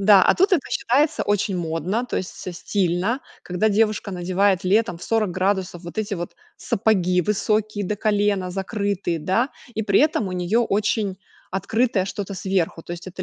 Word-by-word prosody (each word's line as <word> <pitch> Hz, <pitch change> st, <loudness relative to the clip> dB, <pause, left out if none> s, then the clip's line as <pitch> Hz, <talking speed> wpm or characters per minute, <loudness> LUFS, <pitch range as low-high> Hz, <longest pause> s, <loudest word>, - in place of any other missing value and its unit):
Да, 200 Hz, -1 st, +7 dB
а -, -, +6 dB
тут 385 Hz, +2 st, +3 dB
это 335 Hz, -, +5 dB
считается 280 Hz, +4 st, +1 dB
очень 205 Hz, -2 st, 0 dB
модно, 175 Hz, +8 st, -2 dB
то -, -, -3 dB
есть 185 Hz, -, -2 dB
со 185 Hz, -, -7 dB
стильно, 185 Hz, +6 st, 0 dB, 0.2 s
когда 180 Hz, +5 st, 0 dB
девушка 210 Hz, -1 st, +1 dB
надевает 185 Hz, +2 st, +1 dB
летом 195 Hz, -1 st, +2 dB
в -, -, -14 dB
40 215 Hz, -5 st, 0 dB
градусов 185 Hz, -2 st, -1 dB
вот 170 Hz, +4 st, -8 dB
эти 210 Hz, -1 st, -1 dB
вот 175 Hz, -1 st, -6 dB, 0.2 s
сапоги 185 Hz, -4 st, +1 dB
высокие 210 Hz, +2 st, 0 dB
до 210 Hz, +3 st, -2 dB
колена, 205 Hz, -3 st, +1 dB
закрытые, 195 Hz, -3 st, -2 dB
да. 190 Hz, -, +1 dB, 0.3 s
И 220 Hz, -, -1 dB
при 200 Hz, -1 st, +3 dB
этом 285 Hz, -9 st, +2 dB
у -, -, -5 dB
нее 180 Hz, +6 st, +1 dB
очень 210 Hz, -3 st, 0 dB, 0.3 s
открытое 200 Hz, +2 st, +1 dB
что-то 200 Hz, 0 st, -5 dB
сверху. 180 Hz, -2 st, -1 dB
То -, -, -6 dB
есть 175 Hz, +2 st, -7 dB
это 185 Hz, +1 st, -7 dB
200 Hz, 175 wpm, -23 LUFS, 180-215 Hz, 0.3 s, Да